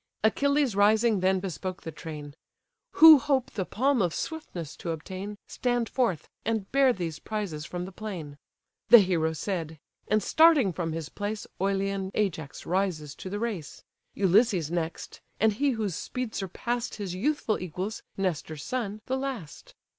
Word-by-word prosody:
Achilles 280 Hz, +1 st, +2 dB
rising 215 Hz, +1 st, +4 dB
then 190 Hz, +1 st, +2 dB
bespoke 185 Hz, 0 st, -5 dB
the 160 Hz, -, -5 dB
train: 150 Hz, -3 st, -8 dB, 0.6 s
"Who 315 Hz, -2 st, +10 dB
hope 265 Hz, -1 st, 0 dB
the 190 Hz, -4 st, -3 dB
palm 265 Hz, +1 st, +2 dB
of 175 Hz, -3 st, 0 dB
swiftness 185 Hz, -, -5 dB
to 170 Hz, -, -6 dB
obtain, 190 Hz, +6 st, -5 dB
Stand 245 Hz, -2 st, 0 dB
forth, 230 Hz, -, 0 dB, 0.2 s
and 220 Hz, -4 st, -2 dB
bear 275 Hz, -1 st, +5 dB
these 170 Hz, -8 st, -4 dB
prizes 195 Hz, -9 st, -4 dB
from 180 Hz, 0 st, -4 dB
the 190 Hz, -, -8 dB
plain." 175 Hz, -9 st, -7 dB, 0.5 s
The 240 Hz, -, +12 dB
hero 175 Hz, -6 st, +2 dB
said, 160 Hz, -1 st, -3 dB, 0.3 s
and 215 Hz, -1 st, +2 dB
starting 310 Hz, -, +5 dB
from 165 Hz, -1 st, -2 dB
his 160 Hz, -2 st, -4 dB
place, 210 Hz, +1 st, -4 dB, 0.2 s
Oilean 195 Hz, 0 st, 0 dB
Ajax 160 Hz, -8 st, -2 dB
rises 175 Hz, -6 st, -1 dB
to 185 Hz, -, -7 dB
the 205 Hz, -, -3 dB
race; 210 Hz, -9 st, -4 dB, 0.3 s
Ulysses 190 Hz, -4 st, +3 dB
next; 170 Hz, -1 st, -4 dB, 0.2 s
and 220 Hz, 0 st, +4 dB
he 280 Hz, +7 st, +1 dB
whose 205 Hz, -6 st, -1 dB
speed 250 Hz, -3 st, -4 dB
surpass'd 235 Hz, +5 st, -3 dB
His 200 Hz, -4 st, -4 dB
youthful 230 Hz, +2 st, 0 dB
equals, 185 Hz, +5 st, -4 dB, 0.2 s
Nestor's 160 Hz, -5 st, -2 dB
son, 215 Hz, -3 st, -3 dB
the 260 Hz, -, -1 dB
last. 260 Hz, -, -6 dB
195 Hz, 155 wpm, -28 LUFS, 170-230 Hz, 0.6 s, The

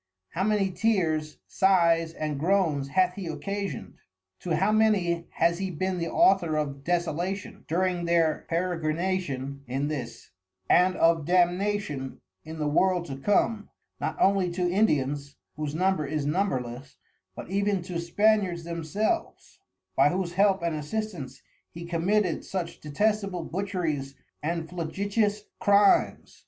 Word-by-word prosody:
How 185 Hz, -, -2 dB
many 205 Hz, -2 st, +1 dB
Tears, 175 Hz, -6 st, 0 dB
Sighs 170 Hz, -4 st, +3 dB
and 155 Hz, -3 st, -3 dB
Groans 165 Hz, -5 st, +1 dB
hath 180 Hz, +4 st, +2 dB
he 185 Hz, -2 st, -6 dB
occasion'd? 160 Hz, -, -5 dB, 0.4 s
To 170 Hz, -3 st, -1 dB
how 190 Hz, +6 st, +2 dB
many 195 Hz, -6 st, +2 dB
has 170 Hz, +1 st, +2 dB
he 190 Hz, 0 st, -2 dB
bin 185 Hz, +2 st, -2 dB
the 170 Hz, -, -2 dB
Author 175 Hz, -5 st, +3 dB
of 140 Hz, -2 st, -3 dB
Desolation, 175 Hz, +3 st, -2 dB
during 175 Hz, +1 st, 0 dB
their 165 Hz, -2 st, +1 dB
Peregrination 165 Hz, -5 st, -1 dB
in 135 Hz, +4 st, -1 dB
this, 120 Hz, -6 st, -6 dB, 0.4 s
and 180 Hz, +1 st, +4 dB
of 165 Hz, -2 st, +3 dB
Damnation 180 Hz, -5 st, 0 dB, 0.2 s
in 160 Hz, +1 st, -8 dB
the 150 Hz, -1 st, -1 dB
World 180 Hz, +3 st, +2 dB
to 135 Hz, -, -6 dB
come, 205 Hz, +7 st, +1 dB, 0.3 s
not -, -, -3 dB
only 195 Hz, -2 st, +3 dB
to 180 Hz, 0 st, 0 dB
Indians, 145 Hz, -7 st, 0 dB, 0.2 s
whose 150 Hz, 0 st, -4 dB
Number 185 Hz, -3 st, +1 dB
is 150 Hz, 0 st, -2 dB
numberless, 135 Hz, -6 st, -2 dB, 0.4 s
but -, -, -8 dB
even 200 Hz, -2 st, 0 dB
to 175 Hz, -2 st, -4 dB
Spaniards 185 Hz, 0 st, +2 dB
themselves, 170 Hz, -, -3 dB, 0.4 s
by -, -, +5 dB
whose 180 Hz, +1 st, -2 dB
help 195 Hz, -1 st, +3 dB
and 170 Hz, -2 st, 0 dB
assistance 150 Hz, -4 st, -5 dB, 0.3 s
he 170 Hz, +1 st, -9 dB
committed 175 Hz, +2 st, 0 dB
such 180 Hz, -3 st, -4 dB
detestable 195 Hz, +3 st, 0 dB
Butcheries 165 Hz, -8 st, -3 dB, 0.3 s
and 165 Hz, +1 st, -2 dB
flagitious 200 Hz, +5 st, -1 dB, 0.2 s
Crimes? 200 Hz, 0 st, +3 dB
175 Hz, 130 wpm, -27 LUFS, 155-195 Hz, 0.4 s, by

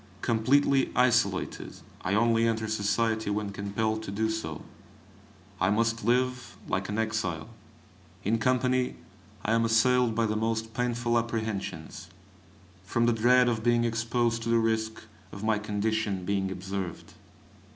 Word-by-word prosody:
Completely 135 Hz, +4 st, +3 dB
isolated, 120 Hz, -6 st, +1 dB, 0.3 s
I 95 Hz, +3 st, 0 dB
only 115 Hz, +1 st, +3 dB
enter 110 Hz, -1 st, -1 dB
society 110 Hz, +1 st, 0 dB
when 105 Hz, 0 st, -2 dB
compelled 105 Hz, +2 st, -2 dB
to 110 Hz, -, -7 dB
do 110 Hz, +2 st, 0 dB
so. 80 Hz, -9 st, -5 dB, 1.0 s
I 95 Hz, -, +2 dB
must 115 Hz, +2 st, +1 dB
live 125 Hz, +2 st, 0 dB
like 95 Hz, +2 st, -2 dB
an 105 Hz, -, -2 dB
exile. 105 Hz, -8 st, -2 dB, 0.7 s
In 115 Hz, +3 st, +1 dB
company 125 Hz, +1 st, +1 dB, 0.5 s
I 110 Hz, -, +1 dB
am 115 Hz, 0 st, +3 dB
assailed 115 Hz, +1 st, +3 dB
by 115 Hz, 0 st, +2 dB
the 110 Hz, -1 st, -1 dB
most 110 Hz, 0 st, -1 dB
painful 120 Hz, -1 st, 0 dB
apprehensions, 110 Hz, -7 st, -4 dB, 0.7 s
from 115 Hz, +4 st, 0 dB
the 120 Hz, -, +3 dB
dread 125 Hz, +3 st, +4 dB
of 115 Hz, -2 st, 0 dB
being 120 Hz, 0 st, +3 dB
exposed 115 Hz, 0 st, 0 dB
to 115 Hz, -, -3 dB
the 115 Hz, -, +4 dB
risk 110 Hz, -1 st, -1 dB, 0.3 s
of 100 Hz, -, -8 dB
my 110 Hz, -1 st, +2 dB
condition 105 Hz, -2 st, -1 dB
being 95 Hz, -1 st, 0 dB
observed. 95 Hz, -1 st, -5 dB
110 Hz, 140 wpm, -28 LUFS, 105-115 Hz, 1.0 s, dread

